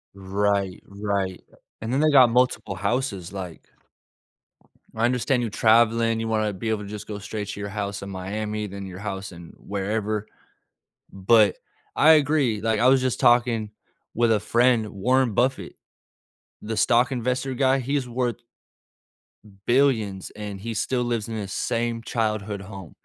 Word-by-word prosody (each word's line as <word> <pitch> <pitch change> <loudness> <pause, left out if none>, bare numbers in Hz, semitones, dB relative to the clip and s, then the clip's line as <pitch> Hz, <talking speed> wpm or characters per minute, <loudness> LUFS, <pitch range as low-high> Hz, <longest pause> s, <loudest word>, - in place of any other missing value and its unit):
Right. 100 0 -1
Right. 100 -2 -3 0.4
And 115 +3 -3
then 135 - +2
they 155 - +4
got 130 -4 +7
multiple 120 -5 +1
houses, 100 -3 -2
like 90 -4 -8 1.3
I 115 +1 +1
understand 125 +1 +1
you 115 - -2
traveling. 115 +1 +3
You 115 - -3
wanna 110 -2 0
be 110 +4 -4
able 105 -1 -1
to 100 - -9
just 105 -1 -7
go 105 -1 -5
straight 105 0 -5
to 105 - -6
your 100 0 -4
house 100 -1 -4
in 100 - -7
Miami, 105 +3 -4
then 100 0 -7
your 95 0 -8
house 95 -2 -5
in 85 -1 -12
wherever, 105 +1 -3 0.8
but 100 +1 +4 0.4
I 155 +2 +6
agree, 140 -7 +2
like, 110 -1 0
I 125 - +4
was 130 0 +5
just 130 -2 -1
talking 120 -3 +3 0.4
with 115 0 +2
a 105 - +3
friend 115 -1 +2
Warren 125 +4 +1
Buffett, 130 +5 0 0.9
the 110 +1 -4
stock 120 +3 +3
investor 125 +2 -1
guy, 135 +1 +2
he 140 +4 -1
is 130 -3 -2
worth 120 -1 -1 1.3
billions, 115 -7 +1
and 105 -2 -6
he 115 +1 -4
still 125 +3 -1
lives 115 -2 -2
in 110 - -4
his 100 -3 -5
same 115 0 -1
childhood 105 -2 -2
home. 95 -4 -10
110 Hz, 160 wpm, -24 LUFS, 100-120 Hz, 1.3 s, got